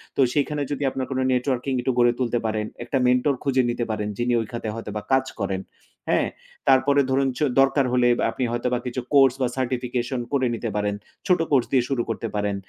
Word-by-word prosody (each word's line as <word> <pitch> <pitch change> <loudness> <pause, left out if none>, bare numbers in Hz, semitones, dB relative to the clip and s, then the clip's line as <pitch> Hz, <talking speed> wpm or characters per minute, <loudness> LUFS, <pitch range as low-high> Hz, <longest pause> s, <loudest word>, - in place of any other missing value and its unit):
তো - - +2
সেখানে 145 0 0
যদি 145 0 -2
আপনার 130 0 -3
কোন 130 - -1
নেটওয়ার্কিং 130 +1 -1
একটু 130 - 0
গড়ে 120 0 +5
তুলতে 120 -2 0
পারেন, 110 -1 -1 0.2
একটা 125 +3 -1
মেন্টর 125 +3 +3
খুঁজে 135 -2 +2
নিতে 120 0 -1
পারেন 105 -1 -2
যিনি 120 0 0
ওই - - -4
খাতে 115 -2 -5
হয়তোবা 105 -2 -5
কাজ 130 0 +3
করেন। 95 -1 -2 0.5
হ্যাঁ? - - +2 0.4
তারপরে 135 +2 +5
ধরুন 135 +1 +2
চ - - -6 0.2
দরকার 135 0 +3
হলে 125 -1 +4
আব - - -7
আপনি 125 - -3
হয়তোবা 120 +1 -1
কিছু 125 +1 -3
কোর্স 135 -3 +6
বা 130 - +3
সার্টিফিকেশন 125 0 -2
করে 130 -2 +2
নিতে 115 0 -4
পারেন। 105 -1 0 0.3
ছোট 180 -3 +4
কোর্স 130 -4 +4
দিয়ে 130 -3 +3
শুরু 135 -3 0
করতে 115 +1 -3
পারেন 105 -1 0
125 Hz, 205 wpm, -24 LUFS, 120-135 Hz, 0.5 s, কোর্স